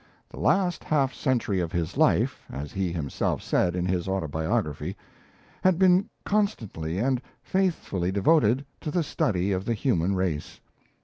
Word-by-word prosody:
The - - -10
last 185 -3 +2
half 140 -3 +1
century 120 -8 0
of 85 -2 -2
his 85 -3 -2
life, - - +2
as 70 +2 -6
he 95 -2 -1
himself 80 -5 -2
said 90 -1 +1
in 90 -1 -1
his 90 -1 -1
Autobiography, 80 -2 -1 0.7
had 185 -2 +4
been 185 +1 +4 0.2
constantly 110 - -1
and 125 +3 +1 0.2
faithfully 160 - 0
devoted 125 +4 +3
to - - -4
the 170 +2 +1
study 100 - 0
of 95 -1 0
the 115 - 0
human 100 - +1
race. 90 -5 -2
95 Hz, 145 wpm, -26 LUFS, -, 0.7 s, had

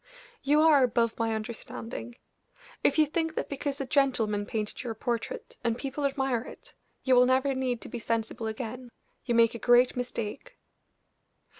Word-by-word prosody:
You 295 +2 +3
are 310 -3 +6
above 230 -2 +1
my 225 -1 +1
understanding. 230 +1 -6 0.7
If 285 - +3
you 310 - +6
think 320 +1 -2
that - - -3
because 285 0 -3
a 275 - -2
gentleman 230 -7 +1
painted 215 -2 -3
your 235 -3 -4
portrait, 235 +1 -4
and 230 -1 0
people 275 +2 -3
admire 270 -4 0
it, - - -12 0.3
you 260 - +3
will 250 0 +6
never 265 +2 +2
need 255 -2 -2
to - - -7
be 240 - -6
sensible 225 0 -2
again, 245 +2 -5 0.4
you 240 -2 0
make 230 -1 +5
a 235 - -6
great 245 +1 +5
mistake." 250 - -5
245 Hz, 165 wpm, -28 LUFS, 230-275 Hz, 0.7 s, are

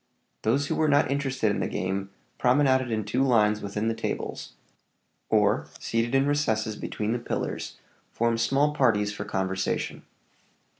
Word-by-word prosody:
Those 135 +6 +1
who - - -1
were 155 - +2
not 145 -2 +3
interested 135 -6 0
in - - -1
the - - 0
game 95 +1 -2 0.3
promenaded 130 0 +3
in 110 -2 -1
two 115 - 0
lines 105 -5 +3
within 105 +2 -2
the 115 - +1
tables; - - -4 0.8
or, - - +2
seated 115 +3 -1
in 135 +1 +4
recesses 110 -7 0
between 105 +1 -3
the 120 - -1
pillars, 120 - -4 0.3
formed 115 0 0
small 140 +5 +2
parties 105 -7 +2
for - - -5
conversation. 95 0 -2
115 Hz, 150 wpm, -26 LUFS, 105-135 Hz, 0.8 s, in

